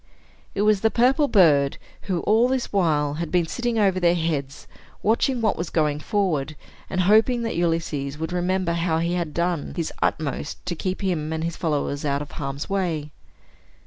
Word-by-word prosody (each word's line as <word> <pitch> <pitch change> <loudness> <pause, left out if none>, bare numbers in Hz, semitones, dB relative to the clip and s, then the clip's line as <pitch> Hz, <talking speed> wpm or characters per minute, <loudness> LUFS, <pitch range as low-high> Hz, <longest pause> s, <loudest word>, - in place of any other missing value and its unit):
It 200 - +1
was 210 -2 +3
the 220 - +4
purple 260 +6 +3
bird, 150 - +4 0.3
who, 175 -3 0
all 225 +3 +3
this 255 -3 -2
while, 150 -7 +2
had 165 +1 -4
been 180 -2 +2
sitting 240 +6 -2
over 195 -3 +3
their 175 -1 +3
heads, 150 -5 -3 0.4
watching 235 +3 +2
what 215 -3 +2
was 170 0 -4
going 150 -2 +1
forward, 155 -5 -1 0.3
and 185 - 0
hoping 220 +5 +4
that 225 - -2
Ulysses 165 -4 -1
would 160 +3 -4
remember 180 0 0
how 170 -1 0
he 170 +2 0
had 170 -3 -2
done 170 -1 -1
his 170 -3 -3
utmost 150 -1 -2
to 180 - -2
keep 185 +4 -3
him 160 -5 -1
and 160 0 -2
his 165 0 -2
followers 145 -3 -2
out 140 0 0
of 145 - -13
harm's 140 0 -5
way. 170 -7 -2
170 Hz, 180 wpm, -24 LUFS, 150-195 Hz, 0.4 s, the